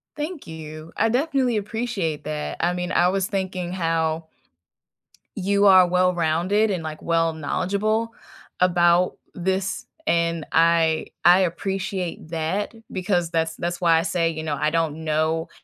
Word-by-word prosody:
Thank 300 - -5
you. 155 0 -9
I 225 - +3
definitely 260 -2 +1
appreciate 210 -7 -3
that, 150 0 -4
I 175 +1 +1
mean, 180 0 -3
I 175 0 +3
was 190 0 0
thinking 185 -4 -3
how 165 -2 -1 1.1
you 200 +2 +3
are 185 -2 +7
well-rounded 180 +3 +2
and, 180 -3 -2
like, 155 -1 -6
well 165 -1 +1
knowledgeable 200 +8 -1 0.5
about 175 0 +3 0.2
this, 190 +2 -2 0.2
and 170 -2 +1
I 165 -1 +3 0.2
I 180 +2 +7
appreciate 185 -1 -3
that, 165 +7 -2 0.2
because 180 -2 0
that's 160 -1 -1
that's 175 0 -3
why 165 -2 +4
I - - +1
say, 170 -1 0
you 160 -1 -5
know, 155 -2 -2
I 155 - +1
don't 160 -1 -1
know 160 +1 0
175 Hz, 140 wpm, -23 LUFS, 160-195 Hz, 1.1 s, are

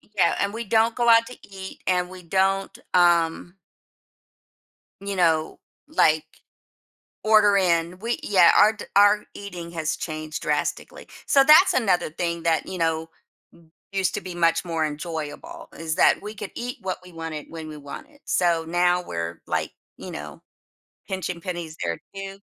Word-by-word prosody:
Yeah 175 -4 +3
and 200 +1 0
we 230 +1 -4
don't 225 +2 +2
go 240 -1 +2
out 230 0 +6
to 250 - -10
eat 190 -1 -10
and 180 -1 +1
we 185 -1 -11
don't, 195 +2 0 0.2
um 175 0 +3 1.5
you 200 0 -4
know, 160 -3 +1 0.3
like, 160 - +3 1.0
order 215 -2 +5
in, 170 -1 +1
we 235 +2 -2
yeah, 185 -4 +5
our 215 - +6
d 220 - -9
our 205 +1 +5
eating 180 -4 -8
has 155 -2 -2
changed 155 -1 -5
drastically. - - -2 0.2
So, 275 -1 +5
that's 315 +6 +7
another 190 -10 +1
thing 170 0 -3
that, 165 -1 +1
you 185 - -6
know, 160 -1 0 0.8
used 190 -2 0
to - - -2
be 185 -1 -8
much 165 0 +2
more 165 -2 -1
enjoyable 160 - -6
is 160 -1 -2
that - - +4
we 210 +1 -7
could 210 - -7
eat 245 +1 -5
what 185 -1 -3
we 180 - -14
wanted 165 -2 -6
when 160 -1 -8
we 155 - -8
wanted. 150 - -10
So, 170 -2 +1
now 175 +1 +2
we're, 85 0 -5
like, - - -1 0.3
you - - -9
know, 75 0 -8 0.7
pinching 180 -2 -4
pennies 175 -3 -5
there 85 -1 -2 0.2
too. 195 0 -7
180 Hz, 160 wpm, -24 LUFS, 165-200 Hz, 1.5 s, that's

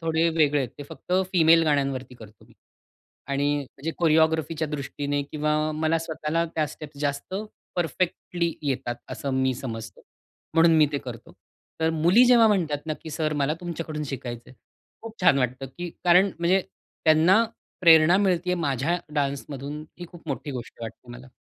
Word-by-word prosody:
थोडे 165 0 +1
वेगळे 150 -3 +2
आहेत. 130 - -2
ते - - -5
फक्त 180 - -8 0.2
फिमेल 165 -1 +6
गाण्यांवरती 135 -4 -1
करतो 110 -3 -15
मी - - -22 0.8
आणि 145 0 0 0.2
जे 165 - 0
कोरिओग्राफीच्या 160 -1 +2
दृष्टीने 145 0 -3
किंवा 150 +1 -1 0.2
मला 160 +1 +1
स्वतःला 160 0 -2
त्या 155 -1 +1
स्टेप्स 150 0 -11
जास्त 145 +5 -2 0.4
परफेक्टली 170 0 -1
येतात 130 -4 -2 0.2
असं 140 - -4
मी 130 -1 +1
समजतो. 115 -3 -7 0.5
म्हणून 165 0 +6
मी 155 - +6
ते 145 - 0
करतो. 120 -4 -9 0.5
तर 160 0 +2
मुली 170 +9 +5
जेव्हा 240 -2 +6
म्हणतात 165 -8 +1
ना 155 - -1
की, 160 - -8
"सर, 155 0 -1
मला 145 +1 0
तुमच्याकडून 165 -3 -5
शिकायचंय." 125 -3 -7 0.5
खूप 225 -1 -8
छान 140 -6 +5
वाटतं 130 +1 -1
की 175 +7 -7 0.2
कारण 180 +3 +6
म्हणजे, 175 +3 +3 0.4
त्यांना 165 +7 +5 0.4
प्रेरणा 165 0 +7
मिळतेय 180 -2 +1
माझ्या 160 +1 0 0.2
डान्समधून 140 +1 -3 0.2
ही 175 - -7
खूप 165 -2 -13
मोठी 145 +1 -4
गोष्ट 120 -3 -8
वाटते 120 +2 -9
मला. 125 +2 -11
155 Hz, 155 wpm, -25 LUFS, 140-165 Hz, 0.8 s, प्रेरणा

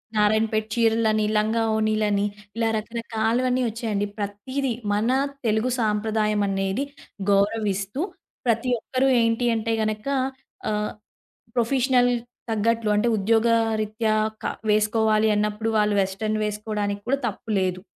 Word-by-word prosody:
నారాయణపేట్ 215 +1 +2
చీరలని, 225 -2 +2
లంగావోనిలని, 215 -1 +1 0.3
ఇలా 225 0 +1
రకరకాలవన్నీ 230 +3 -1
వచ్చాయండి. 220 -3 -2
ప్రతీదీ 220 +7 -3 0.2
మన 210 +3 +1 0.4
తెలుగు 220 +2 +2
సాంప్రదాయం 215 -1 +1
అనేది 195 +5 -1 0.5
గౌరవిస్తూ, 200 +3 +1 0.4
ప్రతి 230 +1 +1
ఒక్కరు 260 +4 0
ఏంటి 230 +1 +1
అంటే 225 0 -1
గనక 215 +2 -2 0.6
ఆహ్, 210 0 -1 0.6
ప్రొఫెషనల్ 245 +1 +3 0.4
తగ్గట్లు 225 0 +1
అంటే 210 +3 +2
ఉద్యోగరీత్యా 220 0 +2 0.3
క - - -5 0.2
వేసుకోవాలి 215 +1 +3
అన్నప్పుడు 210 +2 0
వాళ్ళు 210 0 +2
వెస్టర్న్ 215 +3 -1
వేసుకోవడానికి 210 -1 -2
కూడా 275 +2 +2
తప్పు 220 +1 -7
లేదు. 185 -1 -1
220 Hz, 105 wpm, -24 LUFS, 210-230 Hz, 0.6 s, ప్రొఫెషనల్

